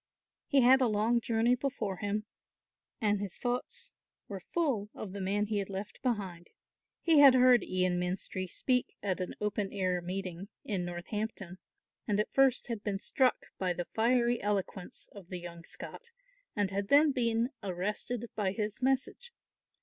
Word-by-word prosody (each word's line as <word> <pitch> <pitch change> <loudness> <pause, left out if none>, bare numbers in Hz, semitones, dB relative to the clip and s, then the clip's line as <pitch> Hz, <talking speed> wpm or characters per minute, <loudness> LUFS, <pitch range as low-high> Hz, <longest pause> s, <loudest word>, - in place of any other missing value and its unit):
He 275 -2 +4
had 260 +2 +6
a 255 - +4
long 225 +2 +2
journey 230 +1 +2
before 250 -7 -2
him 205 +2 -2 0.7
and 210 -3 +2
his 200 -3 -5
thoughts 470 - -3 0.3
were 195 -2 -6
full 265 -12 0
of 190 -3 -6
the 200 - -5
man 200 +2 +1
he 210 0 -1
had 200 - -4
left 195 +1 -6
behind. 195 -8 -2 0.5
He 325 -3 +5
had 275 -3 +9
heard 250 -4 +6
Ian 185 -1 +1
Menstrie 185 +1 -3
speak 250 +7 0
at 190 -2 -1
an 180 - -4
open 210 -1 -1
air 185 -3 0
meeting 185 +1 -5 0.2
in 190 -4 -1
Northampton, 185 +1 -5 0.5
and 210 -1 +1
at 210 - -1
first 270 -2 +4
had 230 -4 -4
been 205 -2 -1
struck 255 +5 +1
by 185 -2 +1
the 175 0 -4
fiery 240 +1 +2
eloquence 195 -2 -2
of 195 -4 -12
the 180 - -4
young 170 -1 -9
Scot 475 - -7 0.5
and 205 -3 0
had 200 0 -2
then 290 +5 +6
been 235 -1 +1
arrested 205 +5 -2
by 195 -3 0
his 210 +2 -3
message. 270 - 0
210 Hz, 165 wpm, -31 LUFS, 190-245 Hz, 0.7 s, had